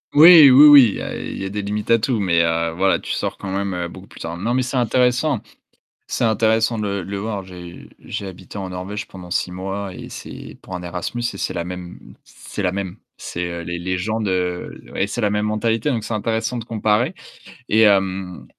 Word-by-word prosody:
Oui, 155 -3 +10
oui, 145 +4 +9
oui, 145 -2 +10
il - - -6
y - - -5
a - - -5
il - - -6
y - - -3
a - - -3
des 105 0 -4
limites 105 +1 -4
à 115 - +6
tout, 115 +1 -1
mai, 85 -4 +2
heu, 85 0 0
voilà, 95 +2 +2
tu - - -7
sors - - -2
quand 95 - -7
même 95 -3 -2
beaucoup 95 +2 -11
plus - - -15
tard. 85 +1 -5
Non, 115 +7 -1
mais 130 - +2
c'est 130 +1 -2
intéressant, 125 +2 +2 0.7
c'est - - -3
intéressant 110 0 +2
de 100 -2 -2
de 95 - -9
le 100 - -3
voir. 105 -1 -3
J'ai 90 -2 -11 0.2
j'ai 100 - -5
habité 95 +2 -11
en 95 -2 -4
Norvège 95 +4 -6
pendant 90 -2 -9
6 90 - -1
mois 95 +1 -5
et - - -9
c'est - - -9
pour 90 - -6
un 90 - -7
Erasmus 90 +7 -4
et - - -8
c'est - - -2
la 85 - -2
même 90 0 -7 0.2
c'est 105 - -8
la 90 - +1
même. 95 0 -5 0.2
C'est 85 -1 -5
les 85 0 -4
les 90 +1 -2
gens 110 +4 -2
de 90 -3 -2
oui, 100 - -1
c'est 120 - -3
la 105 -2 +1
même 105 +1 0
mentalité, 110 +5 0
donc 115 -4 -2
c'est 110 - -3
intéressant 110 +3 -1
de 115 - -6
comparer, 115 - 0 0.6
et 110 +1 +5
hem 95 - +1
100 Hz, 225 wpm, -21 LUFS, 90-110 Hz, 0.7 s, Oui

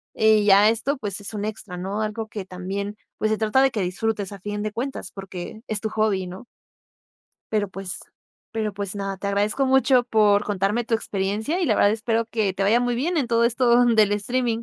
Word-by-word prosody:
eh, 220 0 +5
y 210 - +1
ya 205 +1 +6
esto 260 +6 0
pues 205 -5 -3
es 200 - -4
un 205 -1 -3
extra, 210 -3 -6
¿no? 195 +4 -3
Algo 215 +1 -4
que 210 -3 -6
también, 195 +3 -5 0.2
pues, 215 - 0
se 220 - +1
trata 220 +4 +3
de 270 - +3
que 215 - -2
disfrutes 200 +2 -2
a 200 - -9
fin 205 +2 -4
de 215 0 -2
cuentas 245 -3 -4
porque 195 +1 -8
es 215 -1 +1
tu 220 - -2
hobby 210 -4 0
¿no? 185 +7 -9 1.1
Pero 210 -2 0
pues 190 0 -3 0.5
pero 220 -2 -2
pues 200 0 -4
nada, 195 -1 -3
te 200 +2 -4
agradezco 205 +6 +1
mucho 265 -1 +4
por 210 -4 +3
contarme 205 +3 0
tu 230 - 0
experiencia, 215 - -1
y 355 - +1
la - - +2
verdad 205 - +4
espero 225 +1 0
que 220 -4 0
te 195 +1 -1
vaya 225 +4 +4
muy 245 -1 0
bien 330 +8 -1
en 275 -6 0
todo 230 0 +3
esto 240 0 +4
del 220 -4 +4
streaming. 230 +2 -1
215 Hz, 220 wpm, -23 LUFS, 200-230 Hz, 1.1 s, ya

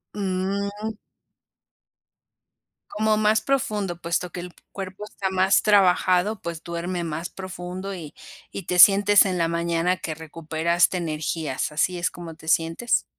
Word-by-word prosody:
Mm. 200 +2 -2 2.0
Como 215 +1 +1
más 215 +1 +3
profundo, 210 -8 -1
puesto 170 +1 -2
que 180 - -6
el 180 - -7
p - - -26
cuerpo 195 +1 -7
está 195 -2 -4
más 190 +1 +3
trabajado, 190 0 +3
pues, 170 -1 -6
duerme 170 +1 -3
más 165 +1 -4
profundo 185 +1 -7
y 160 -5 -9 0.4
y 195 - -6
te 180 +1 -1
sientes, 205 +2 +7
en 185 -2 -1
la 165 - +1
mañana, 170 +2 0
que 160 - -4
recuperaste 165 +3 0
energías, 155 -4 -3
¿así 175 +4 0
es 175 +1 -1
como 170 -2 -9
te 160 0 -15
sientes? 165 +8 +1
180 Hz, 140 wpm, -24 LUFS, 170-200 Hz, 2.0 s, sientes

